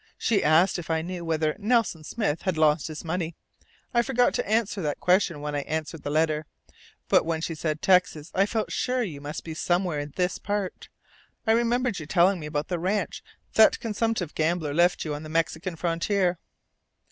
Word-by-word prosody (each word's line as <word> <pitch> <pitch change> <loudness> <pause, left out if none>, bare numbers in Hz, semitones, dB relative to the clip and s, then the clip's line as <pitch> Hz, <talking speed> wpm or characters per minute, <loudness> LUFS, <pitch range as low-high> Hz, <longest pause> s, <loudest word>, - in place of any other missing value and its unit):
She 215 -4 +1
asked 170 +5 +4
if 170 - -8
I 160 0 0
knew 180 0 -5
whether 155 -2 0
'Nelson 215 -7 +1
Smith' 165 -2 -2
had 185 -4 -1
lost 155 -1 +3
his 155 -1 -7
money. 170 0 -3 0.6
I 235 - +4
forgot 245 0 +2
to - - -2
answer 215 -2 +1
that 150 -3 -2
question 180 -4 +2
when 150 0 -4
I 145 - 0
answered 155 +2 -4
the - - -4
letter. 155 0 +1 0.6
But - - +4
when 165 0 -1
she 165 +1 -3
said 155 -1 -3
'Texas' 180 -4 +3
I 195 +2 +3
felt 220 0 -2
sure 255 0 0
you 155 -9 -6
must 145 +1 -6
be 160 - -6
somewhere 175 -1 0
in 145 0 -5
this 180 0 0
part. 205 -2 -3 0.6
I 220 - +3
remembered 235 -1 +1
your 155 - -8
telling 180 +2 +3
me 150 - -6
about 150 0 -2
the 175 -2 -2
ranch 190 +2 -1 0.3
that 220 - +6
consumptive 225 -6 -1
gambler 160 -2 0
left 175 +3 +3
to 155 - -3
you - - -1
on 145 - -5
the 155 - -8
Mexican 165 +2 -1
frontier." 175 +2 0
170 Hz, 195 wpm, -26 LUFS, 155-200 Hz, 0.6 s, that